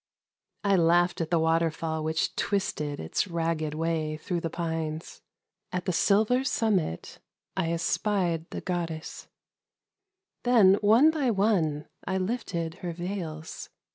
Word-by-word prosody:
1 195 -4 +3
laughed 175 +1 +3
at 160 - -2
the 170 - +3
water 165 +1 +3
tall 160 0 -3
which 160 +1 -1
twisted 150 -7 -1
it: 80 - -1
way 160 -2 -1
through 175 +3 -2
the 165 - -2
pines: 160 -2 -4 0.5
at 180 -1 -3
the 185 - 0
silver 215 +8 +3
summit 205 - -1 0.4
1 - - 0
espied 170 0 0
the 170 -3 -4 1.1
Then 225 -6 +6
one 230 +9 +6
by 295 -5 0
one 195 -9 +1 0.2
I 190 - -1
lifted 185 -5 -3
her 175 -2 -4
\eils. 175 -4 -5
170 Hz, 120 wpm, -28 LUFS, 160-200 Hz, 1.1 s, Then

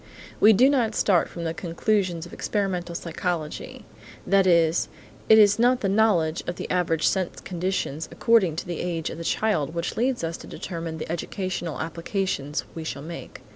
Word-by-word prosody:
We 215 - +8
do 240 +5 +6
not 245 -6 +2
start 185 -4 +3
from 170 - -7
the 165 -1 -2
conclusions 175 0 -1
of 175 - -13
experimental 180 -4 -2
psychology. 170 -2 -4 0.4
That 195 0 +4
is, 170 -1 +3 0.4
it 220 - +9
is 205 0 +6
not 245 +2 +4
the 195 - +1
knowledge 190 -6 +2
of 175 - -2
the - - -5
average 165 -3 +1
sense 185 -3 0
conditions 175 -4 -3
according 220 -9 +3
to - - -4
the 175 -2 -4
age 170 -3 -2
of - - -7
the - - -5
child 165 -6 0
which 170 0 -3
leads 250 -2 0
us 165 0 -2
to - - -11
determine 165 -2 -5
the 160 - -5
educational 175 -1 -3
applications 165 -2 -2
we 165 - -6
shall 145 -3 -5
make. 170 +2 -9
175 Hz, 175 wpm, -25 LUFS, 165-200 Hz, 0.4 s, it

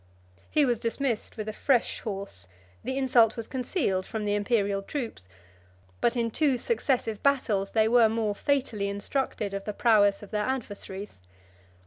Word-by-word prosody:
He 300 -2 +3
was 240 -4 +1
dismissed 235 -1 -2
with 215 -1 -4
a 215 - -3
fresh 255 +1 +1
horse; 195 - -6 0.4
the 260 +3 -3
insult 245 -4 +4
was 230 - -4
concealed 250 - -1
from 215 +2 -4
the 205 - +1
Imperial 205 -1 +1
troops; 220 - -6 0.7
but 240 - +2
in 230 -1 0
two 280 0 +2
successive 245 - -1
battles 220 -8 +1
they 220 -1 +4
were 230 -1 +5
more 220 -2 0
fatally 225 -5 0
instructed 205 0 -2
of 195 0 -3
the 210 - -4
prowess 205 -3 +3
of 205 - -12
their 210 -1 0
adversaries. 205 - -5
220 Hz, 155 wpm, -27 LUFS, 205-255 Hz, 0.7 s, were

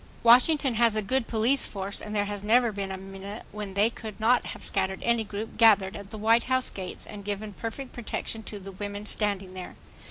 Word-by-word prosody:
Washington 255 +3 +6
has 230 -1 +3
a 215 - 0
good 250 +4 0
police 235 +4 +3
force 195 0 -4
and 210 0 -6
there 205 -1 +1
has 205 -1 -5
never 235 +2 +4
been 195 -2 -4
a 190 - -4
minute 195 +2 -8
when 205 -2 -6
they 210 +3 +3
could 220 -3 -9
not 240 +3 +3
have - - -7
scattered 190 -1 -1
any 235 -1 +2
group 210 +1 -6
gathered 205 -4 +5
at 200 -1 -8
the 220 - -8
White 225 +2 +3
House 260 0 +1
gates 185 -2 -7
and 205 -1 -9
given 205 +1 -4
perfect 235 +6 -6
protection 225 -1 -4
to 210 -1 -7
the 195 0 -9
women 205 +2 -6
standing 200 -3 0
there. 185 -1 -8
210 Hz, 215 wpm, -27 LUFS, 200-230 Hz, -, Washington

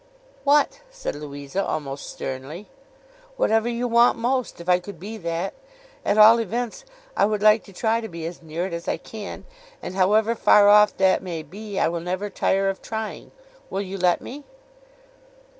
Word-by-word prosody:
'What?' 290 - +3
said - - -5
Louisa, 145 +4 -5
almost 140 -2 -4
sternly. 135 +9 -6 0.7
'Whatever 225 - +2
you 240 +1 -2
want 235 +1 +4
most, 250 -1 -1
if 170 - -10
I 180 0 +4
could 180 -1 -10
be 210 +6 -7
that. 170 0 -3 0.5
At 205 - +1
all 220 +2 +8
events, 235 - -3 0.3
I - - +4
would 210 -1 -2
like 215 +1 +5
to - - -14
try 225 +4 0
to 225 - -5
be 165 -1 -7
as 170 +1 -7
near 165 +2 -4
it 190 - -5
as 170 0 -6
I - - 0
can. 215 -3 -9 0.3
And - - -7
however 210 +4 +3
far 210 -3 +5
off 210 0 +6
that 190 -1 +3
may 170 -4 -5
be, 200 +6 -8
I - - +3
will 170 +1 -2
never 185 +4 -3
tire 195 0 +1
of 195 0 -2
trying. 220 -1 -5 0.4
Will 195 - -2
you 195 0 -6
let 180 -1 +2
me? 285 +3 -9
195 Hz, 180 wpm, -23 LUFS, 170-225 Hz, 0.7 s, all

